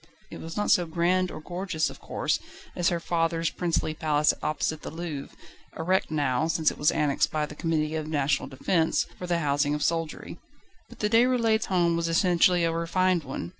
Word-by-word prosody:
It - - -8
was 165 +3 -7
not 210 - +1
so 175 -2 +4
grand 180 +3 +1
or - - -7
gorgeous 175 0 -2
of - - -13
course - - -1 0.4
as 175 -1 +2
her 170 -2 -1
father's 165 -1 0
princely 170 -3 -1
palace 150 -1 +2
opposite 155 0 -1
the - - -6
Louvre, 160 -4 -6 0.4
a 160 - -5
wreck 185 +3 +1
now, 145 -1 0
since 160 -1 +2
it - - -10
was 150 - +4
annexed 145 -2 +1
by 155 -1 -1
the 150 - -10
Committee 155 0 -1
of 155 -1 -3
National 140 -3 0
Defence, 160 +5 +1
for 180 - -5
the 175 -1 +1
housing 145 -1 +1
of 150 - -2
soldiery. 165 0 -2 0.5
But - - -12
the 210 - +1
Déroulèdes' 230 -2 +3
home 175 -3 +2
was 170 0 -1
essentially 175 +1 +3
a 165 - +2
refined 175 +1 +1
one. 130 -11 -5
165 Hz, 195 wpm, -27 LUFS, 150-175 Hz, 0.5 s, so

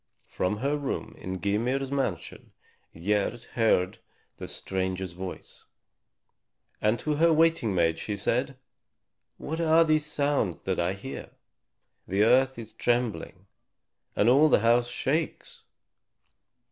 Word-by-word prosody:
From 95 +3 -2
her 140 +6 0
room 145 -2 -4
in 95 0 -5
Gymir's 125 +8 -1
mansion 130 - -3 0.4
Gerd 105 +7 -1
heard 110 -6 +2 0.4
the - - -7
stranger's 95 -1 -3
voice, 90 +2 -8 1.2
and 110 +2 +2
to 150 +2 -2
her 165 +2 +5
waiting 160 - +3
maid 85 -2 +2
she 105 -1 -4
said, 125 +6 -1 0.8
"What 160 +3 -5
are 165 0 +5
these 155 -1 +1
sounds 140 - 0
that 95 -1 -1
I 85 +2 +1
hear? 100 +8 -8 0.8
The 100 +2 +2
earth 130 +3 +4
is 110 -2 -9
trembling 115 -5 -1 0.7
and 105 - +2
all 140 +6 +6
the - - +4
house 120 +1 +3
shakes." 150 +6 -2
115 Hz, 120 wpm, -27 LUFS, 95-140 Hz, 1.2 s, all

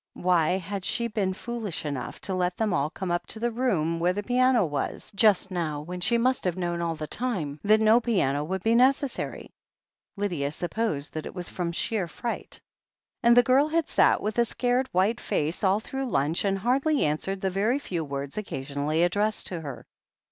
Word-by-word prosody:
Why 180 -1 +2
had 190 +1 -5
she 235 - 0
been 200 -4 -1
foolish 225 -7 -4
enough 140 -4 -4
to 195 - -3
let 180 -1 0
them 220 -4 0
all 140 +2 +1
come 185 +2 -4
up 175 - -1
to 220 - -6
the 240 +1 0
room 180 -10 0
where 175 +2 +2
the 205 +2 -3
piano 250 -2 +3
was, 145 +4 -4
just 200 -2 +3
now, 160 -5 -2
when 180 +4 -7
she 235 +6 +2
must 255 +2 +1
have 180 -1 -1
known 175 -1 -2
all 165 -1 -1
the 155 -1 -5
time 160 - -3
that 215 +1 +5
no 220 +2 +5
piano 165 - +1
would 190 +4 -3
be 225 - +3
necessary? 260 +3 +1 0.7
Lydia 175 -9 -1
supposed 175 -5 -2
that 155 - -4
it - - -10
was 180 -2 -4
from 175 -2 -3
sheer 190 +2 -1
fright. 235 +8 -5 0.6
And 235 -1 +5
the 245 - +8
girl 265 +5 +4
had 325 0 0
sat - - +3
with 215 +3 -1
a 235 - +5
scared, 250 +2 0
white 200 +6 +2
face 155 +6 -1
all 195 +1 +3
through 270 +3 -4
lunch, 150 +2 0
and 195 -1 +1
had 195 - -10
hardly 275 +5 +2
answered 190 +6 -2
the 190 - 0
very 210 +7 +1
few 175 - -3
words 140 +3 -4
occasionally 145 -2 -2
addressed 205 +4 +1
to 175 -3 -4
her. 140 -5 -7
190 Hz, 200 wpm, -27 LUFS, 165-235 Hz, 0.7 s, the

